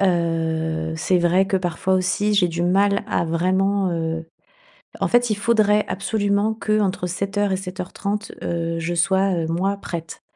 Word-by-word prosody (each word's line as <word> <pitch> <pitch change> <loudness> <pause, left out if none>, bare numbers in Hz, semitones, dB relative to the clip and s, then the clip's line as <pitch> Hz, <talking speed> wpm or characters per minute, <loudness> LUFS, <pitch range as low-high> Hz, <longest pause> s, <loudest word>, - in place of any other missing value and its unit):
heu, 160 -3 0
c'est 180 +3 +2
vrai 180 +2 +3
que 195 - +1
parfois 180 +1 -1
aussi, 185 +3 +1
j'ai 180 -3 +4
du 170 +1 -2
mal 200 +3 +2
à - - 0
vraiment, 190 +3 +1
heu, 165 -1 -3 0.7
en - - +1
fait, 240 -1 +3
il 215 - +1
faudrait 210 -1 +3
absolument 200 +2 0
qu'entre 215 -4 0
7:00 200 +2 -1
et - - +1
7:30, 195 +2 -4
heu, 165 -1 -2
je 170 +1 -2
sois, 190 +2 +2
heu, - - -3
moi, 185 +5 0
prête 165 -4 -7
185 Hz, 155 wpm, -22 LUFS, 170-200 Hz, 0.7 s, j'ai